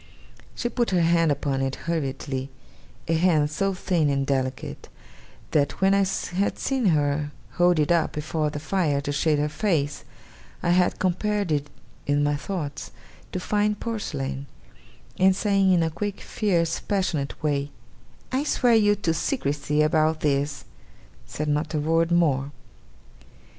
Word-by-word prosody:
She 240 Hz, -, -2 dB
put 240 Hz, 0 st, 0 dB
her 180 Hz, -3 st, +2 dB
hand 165 Hz, -1 st, +3 dB
upon 140 Hz, -1 st, -1 dB
it 135 Hz, 0 st, -1 dB
hurriedly 135 Hz, -4 st, -2 dB, 0.6 s
a 165 Hz, -, +1 dB
hand 160 Hz, -3 st, +3 dB
so 195 Hz, +4 st, 0 dB
thin 175 Hz, -5 st, +1 dB
and 140 Hz, -1 st, 0 dB
delicate, 130 Hz, -1 st, -3 dB, 0.6 s
that 145 Hz, -2 st, +1 dB
when 195 Hz, +1 st, +4 dB
I 200 Hz, 0 st, +4 dB, 0.3 s
had 200 Hz, -, +1 dB
seen 265 Hz, -5 st, 0 dB
her 145 Hz, -2 st, +1 dB, 0.2 s
hold 175 Hz, -1 st, +3 dB
it 150 Hz, +1 st, +2 dB
up 170 Hz, -2 st, +2 dB
before 155 Hz, 0 st, -1 dB
the 150 Hz, -, -5 dB
fire 155 Hz, -2 st, 0 dB
to 145 Hz, -, -3 dB
shade 150 Hz, +1 st, +2 dB
her 145 Hz, +1 st, +1 dB
face, 150 Hz, -4 st, -1 dB, 0.6 s
I 175 Hz, -, +2 dB
had 180 Hz, 0 st, +3 dB
compared 200 Hz, +1 st, 0 dB
it 145 Hz, -1 st, 0 dB, 0.4 s
in 145 Hz, 0 st, +2 dB
my 145 Hz, 0 st, +2 dB
thoughts 150 Hz, -2 st, -5 dB, 0.4 s
to 185 Hz, -, -3 dB
fine 210 Hz, +3 st, +1 dB
porcelain 140 Hz, -12 st, -4 dB, 0.7 s
and 190 Hz, 0 st, +5 dB
saying, 195 Hz, -1 st, +2 dB
in 175 Hz, -2 st, +4 dB
a 160 Hz, -, -1 dB
quick, 205 Hz, +4 st, -4 dB
fierce, 170 Hz, -5 st, 0 dB
passionate 170 Hz, -9 st, -2 dB
way, 140 Hz, -1 st, 0 dB, 0.6 s
'I 260 Hz, +2 st, +1 dB
swear 245 Hz, -5 st, +3 dB
you 205 Hz, -2 st, +5 dB
to 175 Hz, -5 st, 0 dB
secrecy 150 Hz, -, 0 dB
about 155 Hz, 0 st, +2 dB
this!' 140 Hz, -1 st, 0 dB, 0.6 s
said 150 Hz, -, -4 dB
not 150 Hz, +2 st, -1 dB
a -, -, +1 dB
word 165 Hz, +2 st, +1 dB
more. 145 Hz, -5 st, +2 dB
160 Hz, 150 wpm, -25 LUFS, 145-190 Hz, 0.7 s, and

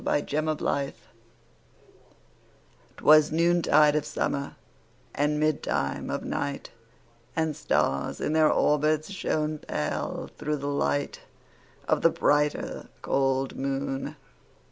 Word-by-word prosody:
1827 145 Hz, -1 st, 0 dB
Evening -, -, -14 dB
Star -, -, -31 dB
'Twas 155 Hz, 0 st, +6 dB
noontide 160 Hz, -2 st, +4 dB
of 150 Hz, -, +1 dB
summer, 140 Hz, -1 st, -3 dB, 0.6 s
And 150 Hz, +1 st, 0 dB
midtime 155 Hz, -1 st, -1 dB
of -, -, -3 dB
night, 140 Hz, -1 st, -3 dB, 0.6 s
And 160 Hz, -2 st, 0 dB
stars, 70 Hz, -, 0 dB
in 150 Hz, -, -1 dB
their 155 Hz, -1 st, +4 dB
orbits, 150 Hz, +3 st, +2 dB
Shone 155 Hz, -5 st, -1 dB
pale, 75 Hz, -, -3 dB
through 150 Hz, 0 st, -1 dB
the 140 Hz, -, -6 dB
light 145 Hz, 0 st, -1 dB, 0.7 s
Of -, -, +2 dB
the -, -, +6 dB
brighter, 145 Hz, 0 st, 0 dB, 0.2 s
cold 135 Hz, -1 st, 0 dB
moon. 135 Hz, 0 st, -3 dB
150 Hz, 105 wpm, -27 LUFS, 140-155 Hz, 0.7 s, Twas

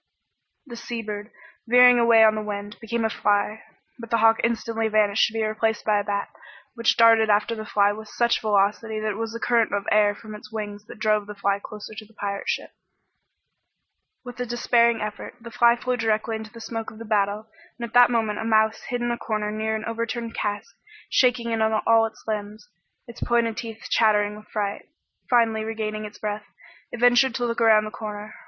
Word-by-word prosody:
The 245 Hz, -4 st, -9 dB
sea 235 Hz, 0 st, -6 dB
bird, 210 Hz, 0 st, -6 dB, 0.4 s
veering 245 Hz, +1 st, +7 dB
away 230 Hz, -1 st, +6 dB
on 215 Hz, -1 st, +6 dB
the 215 Hz, -, -3 dB
wind, 205 Hz, 0 st, -6 dB
became 230 Hz, 0 st, -2 dB
a -, -, +1 dB
fly, 205 Hz, +2 st, 0 dB, 0.4 s
but 230 Hz, -1 st, -9 dB
the 230 Hz, -, +2 dB
hawk 225 Hz, 0 st, +4 dB
instantly 230 Hz, -1 st, -1 dB
vanished 215 Hz, -1 st, +3 dB
to 225 Hz, -, -9 dB
be 225 Hz, -1 st, -1 dB
replaced 220 Hz, 0 st, -1 dB
by 210 Hz, -1 st, +3 dB
a -, -, -2 dB
bat, 200 Hz, 0 st, -2 dB, 0.5 s
which 230 Hz, -1 st, +1 dB
darted 225 Hz, -1 st, +5 dB
after 210 Hz, +2 st, +2 dB
the 215 Hz, -1 st, -7 dB
fly 205 Hz, 0 st, +3 dB
with 215 Hz, +1 st, -8 dB
such 235 Hz, +1 st, 0 dB
velocity 215 Hz, +1 st, 0 dB
that 215 Hz, 0 st, -1 dB
it 200 Hz, -, -6 dB
was 225 Hz, 0 st, -3 dB
the 230 Hz, -, -5 dB
current 230 Hz, -1 st, +2 dB
of 200 Hz, 0 st, -2 dB
air 205 Hz, -1 st, +4 dB
from 215 Hz, 0 st, -11 dB
its 210 Hz, 0 st, -11 dB
wings 210 Hz, -1 st, -6 dB
that -, -, -11 dB
drove 215 Hz, -1 st, +1 dB
the 210 Hz, -, -8 dB
fly 200 Hz, 0 st, 0 dB
closer 210 Hz, 0 st, -9 dB
to 215 Hz, -, -8 dB
the 220 Hz, +1 st, -22 dB
pirate 200 Hz, -1 st, -4 dB
ship. -, -, -3 dB, 1.5 s
With 245 Hz, 0 st, -9 dB
a 250 Hz, -, -1 dB
despairing 235 Hz, -1 st, +2 dB
effort, 210 Hz, +3 st, -6 dB
the 235 Hz, 0 st, -11 dB
fly 235 Hz, +1 st, +4 dB
flew 250 Hz, +1 st, -2 dB
directly 225 Hz, 0 st, 0 dB
into 220 Hz, 0 st, -8 dB
the 230 Hz, 0 st, -12 dB
smoke 225 Hz, 0 st, -5 dB
of 215 Hz, -, -14 dB
the 230 Hz, -, -9 dB
battle, 210 Hz, 0 st, 0 dB, 0.3 s
and 235 Hz, -1 st, -5 dB
at 225 Hz, -, -20 dB
that 245 Hz, 0 st, +7 dB
moment 220 Hz, -3 st, -1 dB
a -, -, -3 dB
mouse 220 Hz, 0 st, +2 dB
hid 245 Hz, -1 st, -2 dB
in 240 Hz, -, 0 dB
a 235 Hz, -, -3 dB
corner 215 Hz, -1 st, -2 dB
near 220 Hz, +1 st, -2 dB
an 220 Hz, 0 st, -5 dB
overturned 230 Hz, 0 st, -4 dB
cask 210 Hz, +2 st, -4 dB, 0.4 s
shaking 245 Hz, -2 st, +2 dB
in 225 Hz, -1 st, 0 dB
all 220 Hz, +1 st, +3 dB
its 220 Hz, -, -15 dB
limbs, 210 Hz, 0 st, -5 dB, 0.4 s
its 235 Hz, -, -12 dB
pointed 235 Hz, -2 st, +1 dB
teeth 225 Hz, -1 st, -7 dB
chattering 210 Hz, -2 st, +3 dB
with 215 Hz, 0 st, -14 dB
fright. 205 Hz, -1 st, -4 dB, 0.4 s
Finally 225 Hz, -3 st, +2 dB
regaining 215 Hz, -1 st, -4 dB
its 210 Hz, -, -10 dB
breath, 210 Hz, 0 st, -5 dB, 0.4 s
it 240 Hz, -, -7 dB
ventured 245 Hz, +1 st, +4 dB
to 245 Hz, -, -1 dB
look 235 Hz, 0 st, -2 dB
around 215 Hz, -2 st, +5 dB
the 215 Hz, -, -6 dB
corner. 210 Hz, -1 st, -7 dB
220 Hz, 210 wpm, -24 LUFS, 210-230 Hz, 1.5 s, veering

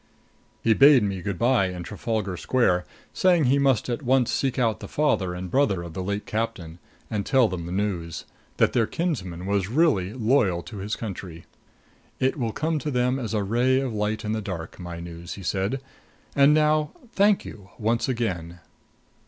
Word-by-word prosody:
He 115 Hz, -, +5 dB
bade 135 Hz, 0 st, +7 dB
me 100 Hz, -3 st, -2 dB
good 100 Hz, -1 st, -3 dB
by 120 Hz, -4 st, +3 dB
in 90 Hz, -1 st, -5 dB
Trafalgar 105 Hz, 0 st, -3 dB
Square, 90 Hz, -3 st, +1 dB, 0.3 s
saying 180 Hz, -4 st, +3 dB
that 125 Hz, -, +2 dB
he 140 Hz, +2 st, +4 dB
must 135 Hz, -5 st, +2 dB
at 120 Hz, +3 st, -2 dB
once 130 Hz, -2 st, +2 dB
seek 135 Hz, -1 st, 0 dB
out 115 Hz, -4 st, +1 dB
the -, -, -8 dB
father 100 Hz, -12 st, 0 dB
and 90 Hz, 0 st, -6 dB
brother 100 Hz, -11 st, +2 dB
of 85 Hz, -2 st, -8 dB
the 95 Hz, -, -4 dB
late 100 Hz, +2 st, -3 dB
captain, 105 Hz, -7 st, -4 dB, 0.3 s
and 105 Hz, -2 st, -1 dB
tell 130 Hz, +2 st, +4 dB
them 90 Hz, -4 st, -5 dB
the -, -, -6 dB
news 90 Hz, -5 st, -2 dB, 0.3 s
that -, -, +3 dB
their 115 Hz, -3 st, +2 dB
kinsman 95 Hz, -, -3 dB
was 100 Hz, -1 st, 0 dB
really 125 Hz, -, +2 dB
loyal 110 Hz, -8 st, +2 dB
to 110 Hz, -, -9 dB
his 100 Hz, +2 st, -3 dB
country. 90 Hz, -6 st, -7 dB, 0.7 s
"It 130 Hz, +1 st, +1 dB
will 115 Hz, -5 st, -1 dB
come 155 Hz, +5 st, -1 dB
to 150 Hz, -, -3 dB
them 125 Hz, 0 st, +1 dB
as 115 Hz, -3 st, -3 dB
a 105 Hz, -, +1 dB
ray 125 Hz, +6 st, +2 dB
of 135 Hz, -4 st, -2 dB
light 105 Hz, +1 st, -2 dB
in 105 Hz, -, -1 dB
the 110 Hz, 0 st, -1 dB
dark 90 Hz, -5 st, -6 dB
my 85 Hz, -1 st, -6 dB
news," 85 Hz, +1 st, -8 dB
he 100 Hz, -, -9 dB
said. 100 Hz, +8 st, -1 dB, 0.6 s
"And 140 Hz, +1 st, +6 dB
now, 150 Hz, 0 st, +2 dB, 0.2 s
thank 200 Hz, 0 st, +3 dB
you 100 Hz, -3 st, -10 dB
once 115 Hz, +4 st, 0 dB
again." 90 Hz, -9 st, -3 dB
110 Hz, 190 wpm, -25 LUFS, 95-130 Hz, 0.7 s, bade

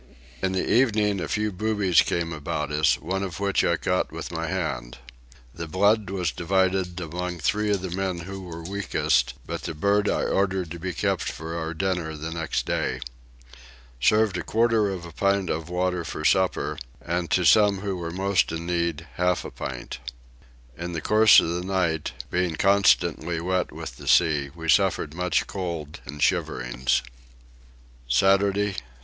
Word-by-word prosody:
In 95 Hz, 0 st, 0 dB
the 95 Hz, -, -1 dB
evening 105 Hz, -6 st, +2 dB
a -, -, -3 dB
few 105 Hz, 0 st, -1 dB
boobies 100 Hz, -3 st, +2 dB
came 85 Hz, -1 st, -1 dB
about 75 Hz, -1 st, -3 dB
us, 75 Hz, +1 st, +3 dB
one 95 Hz, +4 st, -2 dB
of 95 Hz, -2 st, -4 dB
which 100 Hz, -1 st, +1 dB
I 85 Hz, -, +2 dB
caught 90 Hz, +2 st, 0 dB
with -, -, -6 dB
my -, -, -3 dB
hand. -, -, -3 dB, 0.6 s
The 85 Hz, +3 st, -6 dB
blood 100 Hz, +5 st, +2 dB
was 90 Hz, -4 st, -1 dB
divided 95 Hz, 0 st, 0 dB
among 90 Hz, +1 st, -4 dB
three 105 Hz, +6 st, 0 dB
of 100 Hz, -2 st, +1 dB
the 95 Hz, -, -4 dB
men 95 Hz, -1 st, -2 dB
who 95 Hz, +3 st, -7 dB
were 85 Hz, -2 st, -8 dB
weakest, 85 Hz, -9 st, 0 dB
but -, -, -4 dB
the 80 Hz, -, -5 dB
bird 100 Hz, +6 st, +2 dB
I -, -, 0 dB
ordered 95 Hz, -3 st, 0 dB
to 85 Hz, -, -6 dB
be 90 Hz, +2 st, -3 dB
kept 75 Hz, -, -1 dB
for 80 Hz, +1 st, -6 dB
our 80 Hz, -1 st, -3 dB
dinner 90 Hz, -3 st, -2 dB
the 80 Hz, +2 st, -5 dB
next 80 Hz, 0 st, -2 dB
day. -, -, -1 dB, 1.0 s
Served 105 Hz, -, +3 dB
a -, -, -4 dB
quarter 115 Hz, -2 st, +2 dB
of 90 Hz, -3 st, -5 dB
a 85 Hz, -, -9 dB
pint 100 Hz, +2 st, +1 dB
of 80 Hz, +1 st, -3 dB
water 90 Hz, 0 st, -1 dB
for 75 Hz, -, -5 dB
supper, 95 Hz, +2 st, +2 dB, 0.2 s
and 85 Hz, 0 st, -2 dB
to 90 Hz, -, +2 dB
some 100 Hz, -1 st, +5 dB
who 100 Hz, -2 st, -2 dB
were 85 Hz, -2 st, -4 dB
most 95 Hz, +1 st, +1 dB
in 85 Hz, 0 st, -4 dB
need 85 Hz, -2 st, -1 dB
half 90 Hz, 0 st, +1 dB
a -, -, -6 dB
pint. -, -, -6 dB, 0.8 s
In 85 Hz, +3 st, -5 dB
the 80 Hz, -, -3 dB
course 110 Hz, +3 st, +7 dB
of -, -, 0 dB
the 85 Hz, +1 st, -2 dB
night, 90 Hz, -7 st, -1 dB, 0.2 s
being 90 Hz, -2 st, 0 dB
constantly 85 Hz, -3 st, +3 dB
wet 90 Hz, +2 st, -1 dB
with 80 Hz, -6 st, -8 dB
the -, -, -11 dB
sea, 75 Hz, -3 st, +3 dB
we 80 Hz, -1 st, -7 dB
suffered 90 Hz, -4 st, +2 dB
much 90 Hz, +1 st, 0 dB
cold 85 Hz, -6 st, -5 dB
and 75 Hz, +2 st, -4 dB
shiverings. 60 Hz, +1 st, 0 dB, 1.1 s
Saturday 100 Hz, +7 st, +3 dB
6. 95 Hz, -, -6 dB
90 Hz, 175 wpm, -25 LUFS, 80-95 Hz, 1.1 s, course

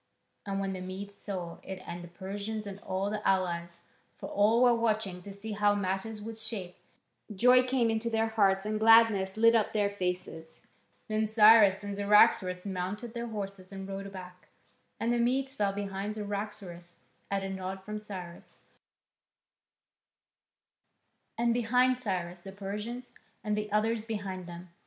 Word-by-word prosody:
And 195 Hz, 0 st, -1 dB
when 195 Hz, -1 st, -2 dB
the 185 Hz, -, -6 dB
Medes 190 Hz, +2 st, -6 dB
saw 180 Hz, -5 st, -6 dB
it 190 Hz, -1 st, -7 dB
and 175 Hz, 0 st, -6 dB
the -, -, -9 dB
Persians 200 Hz, +5 st, -5 dB
and 200 Hz, -1 st, -7 dB
all 195 Hz, +1 st, -2 dB
the 210 Hz, 0 st, -3 dB
allies 170 Hz, -2 st, 0 dB, 0.4 s
for -, -, -7 dB
all 220 Hz, +4 st, +4 dB
were 245 Hz, -1 st, +6 dB
watching 215 Hz, -5 st, 0 dB
to 200 Hz, -, -9 dB
see 200 Hz, +3 st, -8 dB
how 205 Hz, 0 st, +2 dB
matters 200 Hz, +2 st, -2 dB
would 225 Hz, 0 st, -7 dB
shape 215 Hz, -5 st, -6 dB, 0.6 s
joy 250 Hz, +5 st, +6 dB
came 250 Hz, -2 st, +1 dB
into 225 Hz, +1 st, -1 dB
their 225 Hz, -1 st, +1 dB
hearts 200 Hz, -3 st, +2 dB
and 215 Hz, 0 st, -1 dB
gladness 220 Hz, -3 st, +5 dB
lit 230 Hz, +1 st, +6 dB
up 225 Hz, -3 st, +2 dB
their 205 Hz, -2 st, +1 dB
faces. 180 Hz, -4 st, -5 dB, 0.4 s
Then 215 Hz, 0 st, 0 dB
Cyrus 215 Hz, -2 st, +6 dB
and 200 Hz, 0 st, -4 dB
Cyaxares 200 Hz, -2 st, +4 dB
mounted 200 Hz, +5 st, -4 dB
their 235 Hz, -1 st, -4 dB
horses 195 Hz, -3 st, -6 dB
and 195 Hz, -1 st, -7 dB
rode 195 Hz, 0 st, -6 dB
back, 180 Hz, -1 st, -11 dB, 0.5 s
and 230 Hz, +1 st, +1 dB
the 240 Hz, -, +1 dB
Medes 265 Hz, +3 st, +1 dB
fell 205 Hz, -7 st, +1 dB
in 200 Hz, +1 st, -3 dB
behind 195 Hz, +2 st, -4 dB
Cyaxares, 200 Hz, -4 st, -6 dB, 0.3 s
at 195 Hz, -1 st, -1 dB
a 195 Hz, -, -3 dB
nod 190 Hz, 0 st, -5 dB
from 210 Hz, +1 st, -5 dB
Cyrus, 185 Hz, -5 st, -9 dB, 2.8 s
and 235 Hz, 0 st, +2 dB
behind 250 Hz, +2 st, +3 dB
Cyrus 180 Hz, -7 st, -3 dB
the 195 Hz, +1 st, -9 dB
Persians, 210 Hz, +5 st, -5 dB, 0.3 s
and 210 Hz, -1 st, 0 dB
the 210 Hz, 0 st, -3 dB
others 220 Hz, +1 st, +1 dB
behind 195 Hz, -5 st, -5 dB
them. 175 Hz, 0 st, -10 dB
205 Hz, 160 wpm, -30 LUFS, 190-220 Hz, 2.8 s, were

